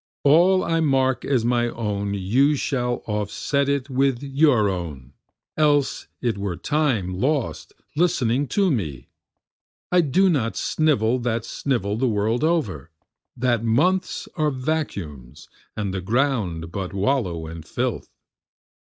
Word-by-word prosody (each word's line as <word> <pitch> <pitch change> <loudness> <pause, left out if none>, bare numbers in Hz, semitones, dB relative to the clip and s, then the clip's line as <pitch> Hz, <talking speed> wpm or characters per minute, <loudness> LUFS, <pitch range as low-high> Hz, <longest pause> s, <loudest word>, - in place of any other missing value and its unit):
All 175 +6 +5
I 165 0 0
mark 135 -4 +2
as 130 -5 +1
my 120 0 +2
own 100 -3 -3
you 125 +10 +2
shall 125 -3 -2
offset 110 +7 -1
it 140 -1 0
with 135 -1 0
your 135 -6 +3
own, 75 -9 -5 0.4
Else 145 -2 +2
it 115 -5 -1
were 100 -3 -2
time 130 -12 0
lost 135 +1 -1 0.2
listening 145 -5 +1
to 195 +6 +2
me. 75 - -3 0.8
I 180 0 +5
do 175 +6 +3
not 135 -10 0
snivel 130 -6 +1
that 115 -1 -2
snivel 105 -7 -2
the 130 +2 +1
world 110 +4 0
over, 110 - 0 0.5
That 120 -2 +1
months 170 +12 +1
are 155 -2 +1
vacuums 125 - -4 0.3
and 100 -3 -2
the 95 - -3
ground 100 - -1
but 95 -1 -4
wallow 95 -6 0
and 80 0 -8
filth. - - -3
120 Hz, 130 wpm, -23 LUFS, 100-145 Hz, 0.8 s, All